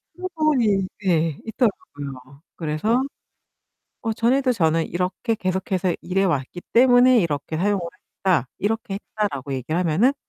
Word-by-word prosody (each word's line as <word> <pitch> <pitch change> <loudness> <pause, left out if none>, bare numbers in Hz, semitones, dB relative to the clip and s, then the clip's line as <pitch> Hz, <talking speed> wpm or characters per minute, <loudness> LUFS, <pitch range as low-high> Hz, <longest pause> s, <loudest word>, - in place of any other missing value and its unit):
충분히 305 - +1 0.2
예 165 -4 +2
있더라고요. 145 - -3
그래서 170 +10 0 1.0
"어 225 -1 -1
전에도 255 +4 +2
저는 165 -5 +2
이렇게 180 +6 -1
계속해서 185 -2 -1
일해왔기 175 -4 -1
때문에 245 0 +6
이렇게 155 -3 -2
사용을 200 +3 +1 0.5
했다. 170 -9 +3
이렇게 210 -1 -1
했다."라고 195 -10 -3
얘기를 135 +6 -2
하면은 185 - +3
190 Hz, 310 characters per minute, -23 LUFS, 160-230 Hz, 1.0 s, 때문에